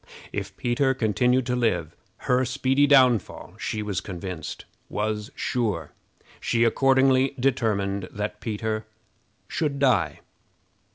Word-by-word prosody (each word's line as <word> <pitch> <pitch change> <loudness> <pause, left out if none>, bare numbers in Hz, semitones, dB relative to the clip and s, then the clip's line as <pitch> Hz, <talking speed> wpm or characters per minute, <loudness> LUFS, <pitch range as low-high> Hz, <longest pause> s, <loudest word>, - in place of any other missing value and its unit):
If - - -5
Peter 130 +2 +1
continued 125 +2 +2
to 125 0 0
live, 90 -10 0 0.3
her 125 +1 +3
speedy 135 +2 +2
downfall, 130 -6 +3
she 110 - -3
was 100 -3 -2
convinced, 90 -4 -6 0.2
was 105 +1 -2
sure. 105 - -2 0.5
She 115 0 +1
accordingly 135 +2 +3
determined 100 -7 0
that 105 +1 -4
Peter 110 0 -3 0.6
should 145 -3 -1
die. 105 - +2
115 Hz, 110 wpm, -25 LUFS, 105-130 Hz, 0.6 s, her